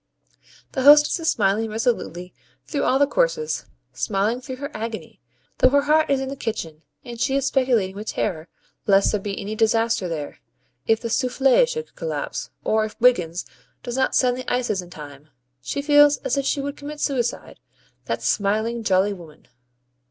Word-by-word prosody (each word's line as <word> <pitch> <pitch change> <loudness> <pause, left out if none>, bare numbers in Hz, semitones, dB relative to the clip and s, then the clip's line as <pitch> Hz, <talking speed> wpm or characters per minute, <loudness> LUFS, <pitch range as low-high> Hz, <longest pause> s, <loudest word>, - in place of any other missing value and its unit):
The 265 - -2
hostess 295 +5 +7
is 325 -1 0
smiling 210 +2 +1
resolutely 215 -6 -2 0.3
through 290 - -2
all 260 - +3
the 285 - +4
courses, 465 - 0 0.3
smiling 215 +4 -1
through 260 0 -7
her 280 +3 -6
agony; 220 0 -6 0.4
though 255 - +6
her 285 +1 +3
heart 310 +2 +3
is 275 -1 +2
in 265 0 -3
the 275 - -5
kitchen, 170 - -5 0.2
and 240 -1 -8
she 265 +2 +1
is 275 -1 +1
speculating 245 -9 +1
with 210 +2 -7
terror 165 -5 -2 0.4
lest 195 -1 +4
there 210 - -1
be 200 0 -4
any 205 +1 -5
disaster 225 -2 +1
there. 150 -3 -5 0.5
If 225 0 +2
the 230 -1 -4
SOUFFLE 265 - +3
should 470 -1 -6
collapse, - - -4
or 220 0 +2
if 215 - -7
Wiggins 180 -9 +2 0.4
does 245 -1 -4
not 265 - +1
send 250 -1 +3
the 255 - -5
ices 240 -6 0
in 175 - -13
time 145 -2 -11 0.3
she 280 - -4
feels 290 0 +6
as 255 - +1
if 275 -1 -1
she 280 - 0
would 285 +1 -5
commit 295 +1 -8
suicide 245 -5 -2 0.5
that - - -3
smiling, 220 +3 0
jolly 195 0 +2
woman! 170 -5 -14
235 Hz, 175 wpm, -23 LUFS, 200-275 Hz, 0.5 s, hostess